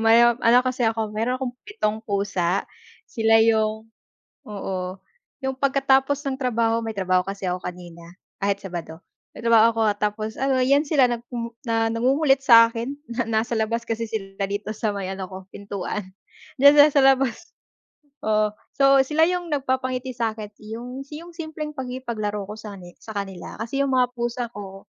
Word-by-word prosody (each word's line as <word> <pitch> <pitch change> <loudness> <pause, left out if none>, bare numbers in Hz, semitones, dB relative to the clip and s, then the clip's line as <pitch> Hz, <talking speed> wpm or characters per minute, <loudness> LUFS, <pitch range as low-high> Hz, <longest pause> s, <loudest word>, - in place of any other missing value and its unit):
May 225 +1 +6
ano 240 0 +4
kasi 255 -1 0
ako, 220 -1 -2
meron 230 +4 -1
akong 255 -2 -4
7 220 - -2
pusa. 200 -3 0 0.4
Sila 225 -1 +3
yung 220 0 +1 0.6
oo, 190 -2 -5 0.4
yung 265 0 -2
pagkatapos 270 0 +2
ng 265 -1 -2
trabaho, 230 -3 +1
may 225 - -3
trabaho 185 -1 +2
kasi 195 0 -5
ako 180 0 -2
kanina 175 -1 -8 0.4
kahit 200 0 +1
Sabado, 175 -4 -7 0.4
may - - -9
trabaho 230 -1 +6
ako 225 0 -2 0.2
tapos 215 +1 -1
ano' 270 +2 0
yan 280 +2 +4
sila 290 -3 +3
nagku 235 -1 -4
na 225 -3 0
nangungulit 270 +4 +2
sa'kin 230 +1 +5
na 240 -2 -3
nasa 225 +1 0
labas 230 +1 -1
kasi 230 0 -3
sila 195 -2 -4
dito 205 +1 -3
sa 215 0 -2
may 195 -2 -3
ano 190 -1 -6
ko 190 - -7 0.2
pintuan. 200 -1 -5 0.5
D'yan 280 +2 +8
sa 295 0 +8
sa 285 -1 +3
labas, 270 +4 +2 0.7
oo 215 -1 +1 0.2
so 275 0 +6
sila 300 +4 +3
yung 355 0 -1
nagpapangiti 260 -3 -1
sa'kin. 220 -3 -3 0.2
Yung 250 +3 -7
yung 330 +4 -9
simpleng 315 -2 -6
pakipaglaro 235 -7 -4
ko 205 - -8
sa 210 -2 -8
ni 175 -2 -12
sa 220 -2 -9
kanila. 195 -3 -6
Kasi 240 +5 -3
yung 275 -1 +1
mga 250 -1 +2
pusa 240 0 -3
ko 195 -2 -9
230 Hz, 165 wpm, -23 LUFS, 205-265 Hz, 0.7 s, D'yan